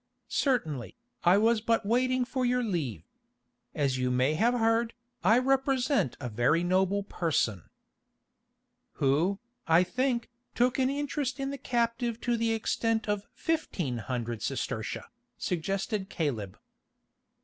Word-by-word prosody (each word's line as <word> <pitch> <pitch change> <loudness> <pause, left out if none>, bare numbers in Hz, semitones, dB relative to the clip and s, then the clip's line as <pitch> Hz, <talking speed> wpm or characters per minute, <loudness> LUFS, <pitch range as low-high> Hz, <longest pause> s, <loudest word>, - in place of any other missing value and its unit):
"Certainly, 160 - 0 0.3
I 180 +2 +6
was 225 +1 +3
but 225 -1 +1
waiting 255 +3 +2
for 260 +1 -2
your 250 0 +2
leave. 150 - -2 0.7
As 135 -3 +1
you 125 0 +1
may 130 +4 +2
have 230 +9 +2
heard, 225 0 +2 0.3
I 215 +6 +6
represent 265 - +2
a 125 - -4
very 120 +9 +2
noble 190 +3 +2
person——" 145 - -1 1.2
"Who, 155 +9 +2 0.3
I 165 +2 +6
think, 240 +5 -1 0.2
took 245 +2 +2
an 260 0 +3
interest 280 -2 -2
in 270 0 -2
the 280 - -6
captive 235 -1 0
to 240 -1 +1
the 230 0 +1
extent 225 0 0
of 205 -1 -1
fifteen 185 - -1
hundred 120 -1 -3
sestertia," - - -3 0.3
suggested 195 +3 -2
Caleb. 115 - -3
220 Hz, 125 wpm, -29 LUFS, 155-245 Hz, 1.2 s, I